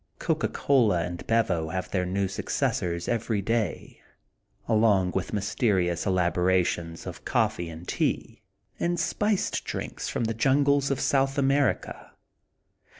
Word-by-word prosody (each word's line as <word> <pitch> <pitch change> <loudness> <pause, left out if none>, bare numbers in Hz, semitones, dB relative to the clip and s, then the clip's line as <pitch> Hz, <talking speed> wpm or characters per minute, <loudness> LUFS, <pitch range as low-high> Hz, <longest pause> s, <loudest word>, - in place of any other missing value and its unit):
Coca - - 0
Cola 110 -11 +2
and 85 -1 -6
Bevo 95 -9 +1
have 95 +1 -4
their 90 -2 0
new 95 +1 0
successors 85 -2 -2
every 115 -2 0
day, 115 +2 -2 0.7
along 105 -5 +3
with 95 - -3
mysterious 100 -4 0
elaborations 90 -2 +1
of - - -8
coffee 85 -1 0
and 80 +2 -10
tea, - - -2 0.4
and 175 0 0
spiced 210 -2 0
drinks - - -5
from - - -2
the 115 0 0
Jungles 140 +4 +2
of 140 -2 0
South 135 +1 +1
America. 140 0 0
100 Hz, 125 wpm, -27 LUFS, 90-130 Hz, 0.7 s, along